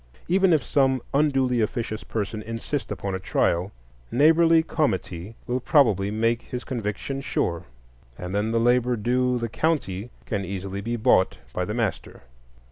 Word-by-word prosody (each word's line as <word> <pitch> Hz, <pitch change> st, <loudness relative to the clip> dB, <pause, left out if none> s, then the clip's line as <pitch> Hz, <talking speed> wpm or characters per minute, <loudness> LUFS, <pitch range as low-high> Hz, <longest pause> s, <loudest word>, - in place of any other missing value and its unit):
Even 190 Hz, +1 st, +3 dB
if 155 Hz, -5 st, +3 dB
some 135 Hz, -2 st, +2 dB
unduly 135 Hz, -4 st, +2 dB
officious 110 Hz, 0 st, -2 dB
person 110 Hz, 0 st, -3 dB
insist 115 Hz, +5 st, -4 dB
upon 100 Hz, 0 st, -3 dB
a 95 Hz, -, -2 dB
trial, 90 Hz, 0 st, 0 dB, 0.4 s
neighborly 160 Hz, +4 st, +5 dB
comity 95 Hz, -, -2 dB
will 125 Hz, +1 st, -1 dB
probably 110 Hz, -, +3 dB
make 115 Hz, +2 st, +1 dB
his 125 Hz, 0 st, -6 dB
conviction 120 Hz, +3 st, -4 dB
sure, 85 Hz, -, -2 dB, 0.5 s
and 90 Hz, +1 st, -6 dB
then 105 Hz, +2 st, 0 dB
the 115 Hz, -, +2 dB
labor 120 Hz, +1 st, +3 dB
due 125 Hz, +3 st, +1 dB
the 115 Hz, -1 st, -2 dB
county 115 Hz, -, -1 dB, 0.2 s
can 100 Hz, -3 st, -2 dB
easily 95 Hz, +1 st, -5 dB
be 115 Hz, +3 st, -2 dB
bought 110 Hz, -5 st, +3 dB, 0.2 s
by 90 Hz, -, -1 dB
the 105 Hz, -, -4 dB
master. 105 Hz, -, -3 dB
115 Hz, 150 wpm, -25 LUFS, 100-130 Hz, 0.5 s, neighborly